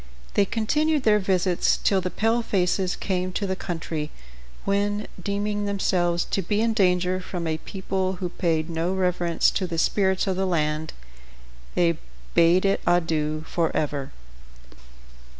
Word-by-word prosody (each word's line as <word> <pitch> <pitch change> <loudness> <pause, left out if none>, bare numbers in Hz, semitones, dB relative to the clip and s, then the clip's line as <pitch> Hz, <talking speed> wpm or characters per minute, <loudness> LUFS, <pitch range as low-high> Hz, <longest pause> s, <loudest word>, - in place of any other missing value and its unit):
They 200 - +4
continued 300 +8 +1
their 210 -2 +5
visits 185 -2 +2
till 195 -2 +2
the 180 - -2
palefaces 195 -5 +1
came 185 -1 -2
to 200 - -1
the 190 -1 -1
country, 160 -4 -4 0.6
when, 205 +1 0 0.2
deeming 205 +1 -1
themselves 180 -4 +1
to 195 - +1
be 205 +4 0
in 225 0 +2
danger 185 -3 +2
from 180 -2 -5
a 160 -1 -1
people 190 0 -2
who 180 -1 -4
paid 165 -3 0
no 170 +2 -1
reverence 180 -3 +2
to 185 - -1
the 170 -1 -4
spirits 190 +3 +2
of 190 -2 -1
the 190 0 +1
land, 155 -2 -1 0.8
they 170 -2 +2 0.3
bade 170 +3 +5
it 195 - +2
adieu 155 -3 +1
forever. 150 -4 -1
185 Hz, 140 wpm, -25 LUFS, 170-200 Hz, 0.8 s, their